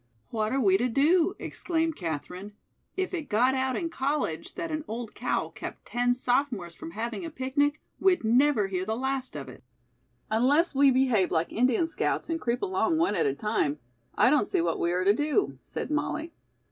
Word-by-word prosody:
"What 215 -1 -1
are 270 - +1
we 195 -5 +4
to 245 - +2
do?" 330 - +3
exclaimed 325 -2 -2
Katherine. 180 +4 -5 0.4
"If 375 0 -1
it 320 -6 -4
got 245 +5 +3
out 260 -1 0
in 335 -2 -2
college 290 +1 -2
that 335 -4 -4
an 310 -1 -2
old 225 0 -5
cow - - -1
kept - - -8
ten 245 0 +1
sophomores 245 -8 0
from 165 - -9
having 230 - -4
a 330 - -4
picnic, 285 +1 0 0.2
we'd 375 -6 +3
never 240 0 +3
hear 185 -1 -2
the 220 +3 -2
last 265 -2 -2
of 140 -2 -6
it." 125 - -12 0.7
"Unless 280 +10 +3
we 280 0 +5
behave 255 -7 +3
like 165 0 0
Indian 250 +6 +2
scouts 325 0 -2
and 325 0 -2
creep 240 0 -1
along 210 - +1
one 325 -8 +2
at 170 -7 +1
a 135 - 0
time, 150 -6 0 0.4
I 245 - +5
don't 295 -8 +3
see - - 0
what 165 -1 0
we 170 - +1
are 180 +1 0
to 200 - +6
do," 300 - 0
said - - -5
Molly. 310 +2 -2
255 Hz, 195 wpm, -28 LUFS, 210-300 Hz, 0.7 s, to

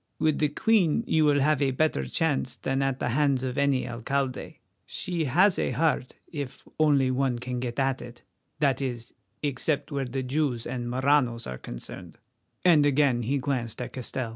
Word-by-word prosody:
With 155 -2 +1
the 150 - +2
Queen 205 +3 +2
you 160 -11 +3
will 145 -1 +4
have 150 0 +2
a 140 - +3
better 130 - 0
chance 130 - 0
than 135 +1 -1
at 135 -1 0
the 125 - -2
hands 135 0 +2
of 130 -1 -2
any 140 -2 +1
alcalde. 130 +3 -3 0.3
She 170 -3 -3
has 180 +9 +4
a - - +1
heart, 155 -5 0
if 145 -5 -7
only 140 -4 +4
one 130 -1 0
can 125 +1 -4
get 120 -1 -4
at 135 -1 0
it—that 130 +3 -4
is, 120 -3 -4 0.3
except 145 +2 -1
where 140 -2 -1
Jews 130 0 -1
and 120 -1 -4
Maranos 130 -2 +2
are 65 0 -6
concerned," 85 +8 -9 0.5
and 165 -5 +6
again 140 -4 +3
he 130 +5 0
glanced 125 -4 -2
at 125 0 -5
Castell. 130 -1 -3
135 Hz, 170 wpm, -27 LUFS, 125-145 Hz, 0.5 s, and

